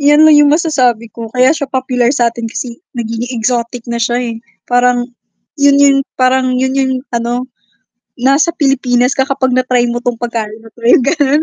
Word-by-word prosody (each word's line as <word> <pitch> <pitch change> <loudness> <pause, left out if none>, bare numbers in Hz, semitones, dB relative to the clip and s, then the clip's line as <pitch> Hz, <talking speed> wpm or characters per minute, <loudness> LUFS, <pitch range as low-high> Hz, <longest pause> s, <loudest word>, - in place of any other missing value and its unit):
Yan 295 +2 +5
lang 315 - +7
yung 295 0 +5
masasabi 255 - 0
ko 230 -1 -7
kaya 255 +3 +4
siya 285 -4 -4
popular 255 -2 0
satin 235 -3 -1
kasi 235 +2 -7 0.2
nagiging 230 +1 -4
exotic 235 +1 -2
na 235 - -2
siya, 240 +1 0 0.2
eh, - - -7 0.3
parang 245 0 +1 0.6
yun 280 0 +5
yung 280 -1 +5 0.2
parang 255 0 +1
yun 260 +1 0
yung 265 -1 0 0.2
ano, 240 +1 -2 0.7
nasa 275 +6 +2
Pilipinas 255 -3 +1
ka 265 +1 -1
kapag 260 -1 0
na-try 255 -1 +1
mo 240 0 -3
'tong 245 -1 -2
pagkain 225 -2 -4
na 225 - -14
'to 235 - -20
yung 250 - +5
ganun. 290 +1 +1
250 Hz, 180 wpm, -13 LUFS, 240-275 Hz, 0.7 s, lang